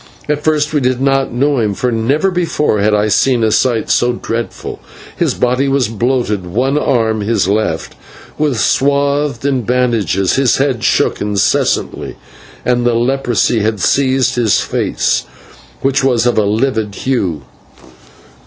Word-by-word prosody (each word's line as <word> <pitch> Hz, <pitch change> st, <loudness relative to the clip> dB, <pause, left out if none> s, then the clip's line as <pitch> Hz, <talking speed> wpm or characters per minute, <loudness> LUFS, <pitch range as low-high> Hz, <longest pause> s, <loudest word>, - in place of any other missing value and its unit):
At 150 Hz, 0 st, -1 dB
first 155 Hz, -1 st, +1 dB
we 150 Hz, -, +2 dB
did 130 Hz, -1 st, 0 dB
not 135 Hz, 0 st, +1 dB
know 140 Hz, +3 st, +1 dB
him, 105 Hz, -3 st, 0 dB
for 125 Hz, +4 st, -1 dB
never 135 Hz, +12 st, 0 dB
before 165 Hz, -, 0 dB
had 105 Hz, +2 st, +2 dB
I 105 Hz, +1 st, +1 dB
seen 120 Hz, +3 st, +2 dB
a 110 Hz, -, +2 dB
sight 120 Hz, +1 st, +1 dB
so 120 Hz, 0 st, +2 dB
dreadful. 115 Hz, -1 st, -5 dB, 0.4 s
His -, -, 0 dB
body 125 Hz, +3 st, +1 dB
was 135 Hz, -4 st, +1 dB
bloated; 115 Hz, -3 st, -1 dB
one 125 Hz, +10 st, -1 dB
arm 115 Hz, -7 st, +1 dB
his 105 Hz, -2 st, 0 dB
left 100 Hz, -5 st, -1 dB, 0.5 s
was 140 Hz, -9 st, +1 dB
swathed 140 Hz, -1 st, 0 dB
in 135 Hz, -3 st, +1 dB
bandages; 115 Hz, -, 0 dB
his 135 Hz, -3 st, +2 dB
head 135 Hz, -4 st, 0 dB
shook -, -, +1 dB
incessantly; 105 Hz, -1 st, 0 dB, 0.5 s
and 120 Hz, -1 st, +1 dB
the 120 Hz, -1 st, +1 dB
leprosy 120 Hz, -2 st, +1 dB
had 110 Hz, 0 st, -1 dB
seized 130 Hz, +4 st, +1 dB
his 115 Hz, -5 st, +2 dB
face, -, -, -1 dB, 0.6 s
which 135 Hz, 0 st, +1 dB
was 125 Hz, -3 st, +2 dB
of 120 Hz, -, +2 dB
a 110 Hz, -, +2 dB
livid 110 Hz, -1 st, -1 dB
hue. 95 Hz, -, -2 dB
125 Hz, 150 wpm, -15 LUFS, 110-135 Hz, 0.6 s, we